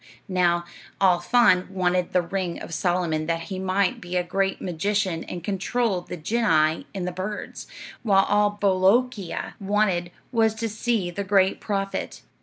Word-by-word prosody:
"Now, 175 Hz, -2 st, +1 dB, 0.3 s
Al 185 Hz, -3 st, +4 dB
Faan 185 Hz, -1 st, +3 dB
wanted 180 Hz, -2 st, 0 dB
the 180 Hz, -, +2 dB
ring 180 Hz, -1 st, -3 dB
of -, -, -8 dB
Solomon 170 Hz, -3 st, 0 dB
that 165 Hz, +1 st, -2 dB
he 185 Hz, -, -4 dB
might 190 Hz, 0 st, 0 dB
be 175 Hz, 0 st, -6 dB
a 180 Hz, -, +1 dB
great 195 Hz, +2 st, -1 dB
magician 185 Hz, 0 st, -1 dB
and 175 Hz, -2 st, -7 dB
control 200 Hz, +1 st, 0 dB
the 175 Hz, -, -7 dB
genii 160 Hz, -4 st, +1 dB
and 180 Hz, -2 st, -3 dB
the -, -, -2 dB
birds, 190 Hz, +4 st, -6 dB, 0.3 s
while 195 Hz, -4 st, +4 dB
all 205 Hz, 0 st, +2 dB
Bolookeea 200 Hz, +2 st, +1 dB
wanted 195 Hz, -3 st, +1 dB, 0.2 s
was 225 Hz, -2 st, +2 dB
to 225 Hz, 0 st, -3 dB
see 215 Hz, -4 st, -1 dB
the 200 Hz, +3 st, -3 dB
great 195 Hz, -1 st, +2 dB
prophet. 195 Hz, -2 st, -3 dB
190 Hz, 155 wpm, -24 LUFS, 175-205 Hz, 0.3 s, Al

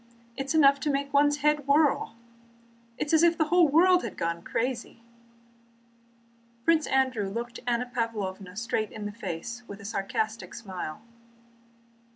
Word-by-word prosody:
It 270 Hz, -, -3 dB
is 320 Hz, -, -1 dB
enough 280 Hz, -2 st, +6 dB
to 295 Hz, -, -1 dB
make 280 Hz, 0 st, -1 dB
one's 290 Hz, +1 st, +4 dB
head 300 Hz, -2 st, +2 dB
whirl! 285 Hz, -5 st, +2 dB, 0.8 s
It -, -, -1 dB
is 295 Hz, -, -3 dB
as 320 Hz, -, +6 dB
if 340 Hz, -1 st, +4 dB
the 315 Hz, -2 st, +1 dB
whole 350 Hz, -1 st, +5 dB
world 355 Hz, +5 st, +5 dB
had -, -, -6 dB
gone 170 Hz, 0 st, -2 dB
crazy." 235 Hz, +2 st, -3 dB, 1.6 s
Prince 325 Hz, -2 st, +3 dB
Andrew 255 Hz, -7 st, +1 dB
looked 235 Hz, +3 st, -5 dB
Anna 240 Hz, 0 st, +1 dB
Pávlovna 205 Hz, -6 st, -4 dB
straight 220 Hz, -1 st, -2 dB
in 215 Hz, -1 st, -7 dB
the 205 Hz, -, -3 dB
face 205 Hz, +3 st, -6 dB
with 200 Hz, -, -9 dB
a 200 Hz, -, -11 dB
sarcastic 220 Hz, +2 st, -3 dB
smile. 190 Hz, -5 st, -7 dB
240 Hz, 155 wpm, -27 LUFS, 210-290 Hz, 1.6 s, enough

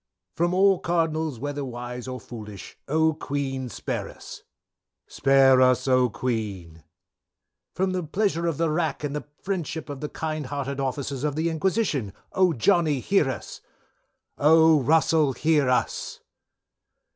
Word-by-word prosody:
_ -, -, -48 dB
"From 175 Hz, +1 st, +1 dB
all 195 Hz, 0 st, +4 dB
Cardinals 160 Hz, -4 st, -1 dB
whether 145 Hz, +3 st, -4 dB
wise 125 Hz, -1 st, -6 dB
or 130 Hz, 0 st, -5 dB
foolish. 105 Hz, -3 st, -10 dB
Oh! 160 Hz, +2 st, +2 dB
Queen 135 Hz, -4 st, -3 dB
Spare -, -, -4 dB
us. -, -, -11 dB, 0.6 s
"Spare 135 Hz, -1 st, +4 dB
us, 130 Hz, 0 st, +3 dB
Oh 130 Hz, -1 st, +4 dB
Queen. 100 Hz, -10 st, -4 dB, 0.9 s
"From 185 Hz, +2 st, 0 dB
the 185 Hz, 0 st, -1 dB
pleasure 170 Hz, +1 st, -1 dB
of 165 Hz, -4 st, -1 dB
the 165 Hz, -2 st, +1 dB
Rack, 160 Hz, -1 st, -1 dB
and 145 Hz, 0 st, -3 dB
the 150 Hz, -, -5 dB, 0.2 s
friendship 170 Hz, -5 st, -3 dB
of 140 Hz, -2 st, -6 dB
the 150 Hz, -, -4 dB
kind 155 Hz, -3 st, -4 dB
hearted 140 Hz, 0 st, -4 dB
officers 135 Hz, 0 st, -3 dB
of 150 Hz, -2 st, -1 dB
the 165 Hz, +2 st, 0 dB
Inquisition. 160 Hz, -, -1 dB, 0.2 s
Oh! 185 Hz, -2 st, +3 dB
Johnny 160 Hz, -, +2 dB
hear 175 Hz, -1 st, +2 dB
us. 125 Hz, -7 st, -7 dB, 0.8 s
"_Oh! 160 Hz, 0 st, +6 dB
Russell 155 Hz, 0 st, +3 dB
hear 150 Hz, 0 st, +2 dB
us. 125 Hz, -, -1 dB
145 Hz, 145 wpm, -25 LUFS, 130-160 Hz, 0.9 s, Oh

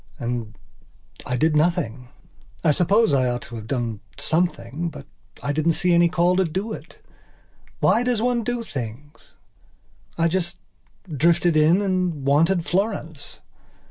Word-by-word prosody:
And 120 Hz, -4 st, -4 dB, 0.7 s
I 125 Hz, -, -1 dB
did 155 Hz, +4 st, +2 dB
nothing. 150 Hz, -7 st, 0 dB, 0.6 s
I 160 Hz, -, +4 dB
suppose 195 Hz, +6 st, +3 dB
I 130 Hz, -2 st, +3 dB
ought 120 Hz, 0 st, -3 dB
to 120 Hz, -, -10 dB
have 110 Hz, -1 st, -7 dB
done 120 Hz, -5 st, -2 dB, 0.2 s
something, 170 Hz, -2 st, -1 dB
but 145 Hz, -3 st, -11 dB, 0.4 s
I 145 Hz, -, -1 dB
didn't 155 Hz, +2 st, +2 dB
see 180 Hz, +2 st, +1 dB
any 170 Hz, 0 st, +5 dB
call 180 Hz, +1 st, +2 dB
to 190 Hz, -, +4 dB
do 190 Hz, +6 st, -3 dB
it. -, -, -10 dB, 0.8 s
Why 230 Hz, -, +4 dB
does 245 Hz, -2 st, 0 dB
one 240 Hz, 0 st, +1 dB
do 240 Hz, +1 st, -2 dB
things? 135 Hz, -, -8 dB, 0.8 s
I 165 Hz, 0 st, +3 dB
just 175 Hz, +1 st, -2 dB, 0.6 s
drifted 170 Hz, +3 st, +3 dB
in 160 Hz, +6 st, +4 dB
and 180 Hz, -7 st, -1 dB
wanted 165 Hz, +5 st, +3 dB
Florence. 175 Hz, -7 st, -3 dB
165 Hz, 140 wpm, -23 LUFS, 140-180 Hz, 0.8 s, any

